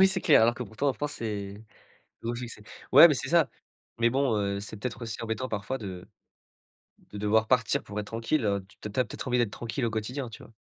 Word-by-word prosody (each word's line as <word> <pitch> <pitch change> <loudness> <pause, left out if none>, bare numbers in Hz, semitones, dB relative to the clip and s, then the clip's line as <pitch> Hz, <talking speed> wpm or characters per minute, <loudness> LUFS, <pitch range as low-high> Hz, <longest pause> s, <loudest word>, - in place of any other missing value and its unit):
Oui, 190 - +8
c'est 190 0 0
clair, 155 -10 +6
alors 120 +1 +4
que 125 - -5
pourtant 115 +6 -2
en - - +2
France, 145 +2 -4
c'est 100 -3 -4 0.7
un - - -4
gros 120 - -1
succès. 120 -3 -7 0.3
Ouais, 150 +6 +11
mais 150 - +2
c'est - - -3
ça, 165 -6 +4 0.5
mais 115 0 +4
bon, 130 -3 +1
heu, 100 -1 -1
c'est 105 +1 -7
peut-être 120 +1 -5
aussi 115 0 -5
embêtant 115 +3 -2
parfois 110 +5 -3
de 95 -5 -7 1.1
de 105 - -6
devoir 110 +2 +2
partir 125 -4 +2
pour 105 0 -7
être 105 - -7
tranquille, 115 +4 -1
heu, 100 -2 0 0.2
tu 105 - -5
tu 130 - 0
as 125 - +3
peut-être - - -7
envie 125 0 +2
d'être 120 -4 +2
tranquille 120 +4 -4
au 115 - -1
quotidien, 120 +4 -3
tu 110 - -11
vois? 115 - -17
115 Hz, 240 wpm, -28 LUFS, 105-130 Hz, 1.1 s, Ouais